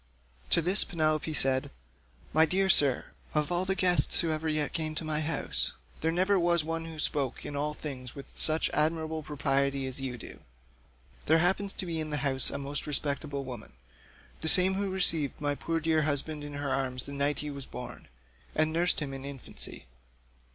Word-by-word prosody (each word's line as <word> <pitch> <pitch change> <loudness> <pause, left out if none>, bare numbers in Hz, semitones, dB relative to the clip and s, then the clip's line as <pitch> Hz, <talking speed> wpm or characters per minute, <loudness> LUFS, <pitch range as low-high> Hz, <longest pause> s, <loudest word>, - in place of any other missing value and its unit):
To 170 - +4
this 185 +5 +5
Penelope 155 -2 0
said, 135 -3 +2 0.6
"My 160 - +6
dear 190 +4 +2
sir, 140 -6 +5 0.3
of 150 +2 +1
all 175 +1 +2
the 190 0 0
guests 180 -2 +4
who 165 - +1
ever 155 +1 -2
yet 150 -2 0
came 155 -2 -2
to 160 - -2
my 155 -1 0
house 155 0 -1 0.3
there 160 - +1
never 190 +3 +3
was 170 -2 +3
one 165 +1 -3
who 165 -1 -8
spoke 140 -4 -1
in 145 - -5
all 150 +1 -1
things 130 -5 -7
with 140 - -10
such 155 +1 +1
admirable 160 +1 0
propriety 140 -2 0
as 130 +1 -2
you 130 -2 -3
do. - - -10 0.9
There 160 - +6
happens 190 +4 +2
to - - -5
be 165 -2 -3
in 155 -1 -3
the 150 - -1
house 130 -1 0
a - - -4
most 140 +2 -3
respectable 145 -1 -2
old 135 - -9
woman—the 65 - -9
same 185 +2 +6
who 200 +1 -1
received 165 -6 +1
my 145 -1 0
poor 165 +3 -2
dear 160 0 +2
husband 150 +1 -1
in 145 0 -7
her 145 -1 -3
arms 130 -2 -1
the - - -9
night 140 0 +1
he 150 - -3
was 140 -2 -7
born, 125 - -8 0.5
and 155 0 +2
nursed 175 0 +3
him 140 -2 -4
in 135 0 -7
infancy. 140 -2 -3
155 Hz, 195 wpm, -29 LUFS, 140-165 Hz, 0.9 s, My